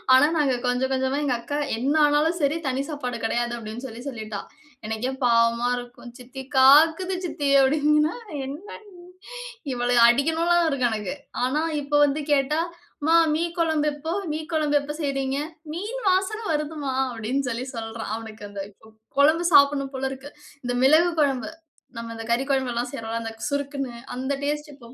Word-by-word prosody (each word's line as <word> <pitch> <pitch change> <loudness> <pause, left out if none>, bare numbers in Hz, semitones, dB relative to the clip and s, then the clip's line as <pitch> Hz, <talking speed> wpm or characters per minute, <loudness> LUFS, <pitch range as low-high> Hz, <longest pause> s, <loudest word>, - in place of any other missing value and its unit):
ஆனா 290 +4 +6
நாங்க 275 -4 +2
கொஞ்சம், 255 +2 0
கொஞ்சமா 265 +2 0
எங்க 255 -3 +1
அக்கா 290 +5 -4 0.2
"என்ன 270 +5 0
ஆனாலும் 305 +4 +2
சரி 290 +3 +1
தனி 265 +1 0
சாப்பாடு 250 -5 -4
கெடயாது." 240 +1 -1
அப்டின்னு 225 +3 -7
சொல்லி 240 +1 -9
சொல்லிட்டா. 215 -5 -6 0.5
எனக்கே 220 +4 -2
பாவமா 235 0 +3
இருக்கும். 245 0 -9
"சித்தி, 255 +2 -9 0.2
காக்குது 320 +7 +6
சித்தி." 290 -4 -2
அப்டிங்கன்னா. 300 - +3 0.3
என்னனா 300 +11 -8 0.9
இவள 245 -1 -1 0.2
அடிக்கணும்லா 325 +7 +2
இருக்கு 275 -5 +1
எனக்கு. 215 +5 -3 0.3
ஆனா 260 +4 +1 0.2
இப்ப 290 +1 0
வந்து 290 +1 +1
கேட்டா, 290 +2 +2 0.5
"மா 330 - +5 0.2
மீன் 335 +2 -1
குழம்பு 315 -3 +1
எப்போ? 320 +3 -4 0.2
மீ 310 - -2
குழம்பு 300 -2 +2
எப்போ 295 +1 -5
செய்றீங்க? 275 -1 -1 0.4
மீன் 430 +9 -4
வாசன 385 +4 +2
வருது 305 +1 -2
மா!" 265 - -1 0.2
அப்டினு 240 +4 -2
சொல்லி 245 +2 -3
சொல்றான். 225 -1 -5
அவனுக்கு 220 -2 -8
அந்த 200 -1 -6 0.2
கொ 220 - -15 0.3
குழம்பு 315 +4 +4
சாப்பனும் 280 -1 +5
போல 265 0 -1
இருக்கு. 270 +2 -9 0.3
இந்த 245 0 -2
மிளகு 315 +6 +5
குழம்பு, 275 0 0 0.5
நம்ம 230 0 -6
இந்த 225 - -6
கறி 255 +3 0
குழம்புலாம் 245 -2 -1
செய்றோம்ல 230 -2 -4
அந்த 225 0 -5 0.2
சுறுக்குனு 280 -3 -3 0.2
அந்த 265 +2 -2
டேஸ்ட்டு 295 0 -3
இப்போ 240 -2 -15
275 Hz, 160 wpm, -24 LUFS, 245-300 Hz, 0.9 s, ஆனா